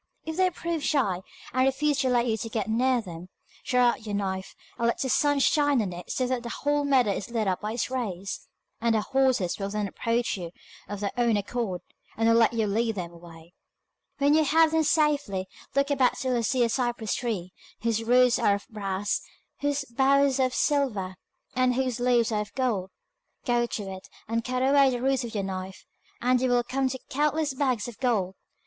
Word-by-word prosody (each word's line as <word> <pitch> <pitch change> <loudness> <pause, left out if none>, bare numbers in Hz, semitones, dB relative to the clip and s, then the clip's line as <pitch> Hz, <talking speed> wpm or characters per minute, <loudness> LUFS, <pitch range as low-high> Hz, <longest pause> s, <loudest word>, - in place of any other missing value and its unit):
If 320 - -4
they 370 0 +4
prove 335 -3 -4
shy, 225 - +1 0.3
and 255 +1 +3
refuse 285 +1 +1
to 265 -2 +2
let 240 -1 +2
you 225 -2 +1
get 215 -2 -2
near 245 +2 +2
them, 175 -3 -9 0.3
draw 250 -2 +3
out 235 - -3
your 205 - -2
knife, 190 -1 -3 0.2
and 235 - +2
let 235 - 0
the 265 - -1
sun 290 +2 +3
shine 290 0 +3
on 195 -5 -1
it 175 0 -9
so 255 - 0
that 250 -1 -1
the 235 - -6
whole 290 +3 0
meadow 260 -6 +3
is 195 +1 -4
lit 225 -3 -1
up 185 -1 0
by 210 +1 -3
its 240 +2 -2
rays, 200 -7 -4 0.3
and 230 -1 +2
the 215 - +2
horses 260 -8 +1
will 195 0 -2
then 210 0 -2
approach 230 +3 -1
you 170 -2 -7 0.4
of 205 -1 -5
their 200 - -1
own 235 -3 +3
accord, 205 -3 -3 0.4
and 225 0 +2
will 230 - +5
let 230 0 +4
you 225 -2 +1
lead 220 +2 0
them 175 -3 -5
away. 170 0 -14 0.6
When 285 0 +3
you 315 0 +5
have 320 +2 +4
them 320 0 +3
safely, 290 - +1 0.3
look 280 +1 +2
about 260 -3 +2
till 255 -1 -1
you 235 - +1
see 245 +2 +1
a 235 - +2
cypress 240 -4 -1
tree, 200 -7 -3 0.3
whose 230 -1 0
roots 250 +1 +4
are 200 - +3
of 200 - -8
brass, 200 -2 -2 0.4
whose 285 0 -1
boughs 275 +2 +3
are 260 - +4
of 255 - -7
silver, 245 -11 0 0.4
and 255 -1 +2
whose 255 -2 -1
leaves 240 -2 +2
are 210 -1 +1
of 210 - -8
gold. 230 -8 0 0.6
Go 240 -1 +2
to 215 - -4
it, 185 - -14 0.2
and 230 +1 -1
cut 255 +1 -1
away 275 0 +5
the 245 -1 -2
roots 265 0 +1
with 230 -2 -6
your 200 - 0
knife, 190 0 -6 0.3
and 250 +1 +2
you 260 - +2
will 245 0 +3
come 265 +2 0
to 260 - -4
countless 300 +1 +1
bags 260 -5 0
of 240 - -10
gold. 215 -8 +1
240 Hz, 210 wpm, -27 LUFS, 205-265 Hz, 0.6 s, will